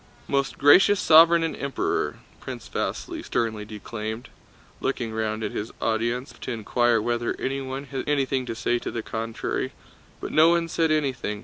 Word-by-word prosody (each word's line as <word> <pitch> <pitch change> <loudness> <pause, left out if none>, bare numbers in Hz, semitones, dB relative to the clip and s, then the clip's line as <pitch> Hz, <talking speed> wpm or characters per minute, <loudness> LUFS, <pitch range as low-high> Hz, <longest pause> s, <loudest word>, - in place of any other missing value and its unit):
"Most 140 -1 0
Gracious 190 +8 +6
Sovereign 165 +1 +7
and 165 - -2
Emperor!" 140 -1 -2 0.2
Prince - - -8
Vasíli - - -4
sternly 110 -3 -1
declaimed, 110 +2 -6 0.5
looking 120 -4 -2
round 110 0 -2
at - - -2
his 105 - -4
audience 120 +4 -1
as - - -17
if - - -25
to - - -4
inquire 115 +1 +2
whether 120 +2 -1
anyone 135 0 -3
had 135 0 -5
anything 135 -3 0
to 115 - -3
say 120 +1 0
to - - -5
the 115 - -4
contrary. 115 0 -3 0.5
But - - -6
no 160 +2 +6
one 170 -1 +2
said 165 0 +1
anything. 130 -9 -1
125 Hz, 170 wpm, -25 LUFS, 115-140 Hz, 0.5 s, Sovereign